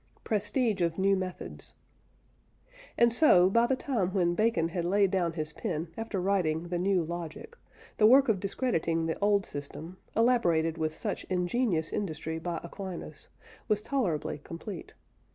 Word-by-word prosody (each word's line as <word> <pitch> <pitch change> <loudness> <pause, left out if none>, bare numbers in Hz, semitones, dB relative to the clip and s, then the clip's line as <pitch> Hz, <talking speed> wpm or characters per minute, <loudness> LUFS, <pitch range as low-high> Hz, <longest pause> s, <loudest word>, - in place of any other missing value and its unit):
PRESTIGE 215 -1 0
OF 170 -1 0
NEW 195 +1 +3
METHODS. 185 -1 -6 1.2
And 235 -1 +5
so, 190 - +6
by 230 +3 +4
the 265 - +2
time 210 -9 -2
when 175 -2 +2
Bacon 195 -5 +1
had 170 0 -3
laid 195 +2 +2
down 175 -4 0
his 155 -1 -4
pen 165 -5 -3
after 225 -3 -3
writing 175 -3 0
the 175 0 -1
New 185 -1 +2
Logic, 170 - -7 0.4
the 215 - +6
work 265 +4 +6
of 215 -5 +2
discrediting 165 -6 -1
the 160 - -2
old 200 -1 +2
system, 155 +5 -7 0.2
elaborated 170 -9 +2
with 155 0 -2
such 210 -3 -3
ingenious 180 -2 0
industry 160 -4 -3
by 170 0 -3
Aquinas, 170 -3 -8 0.4
was 210 0 +1
tolerably 200 - -1
complete. 170 +2 -8
185 Hz, 150 wpm, -29 LUFS, 165-215 Hz, 1.2 s, so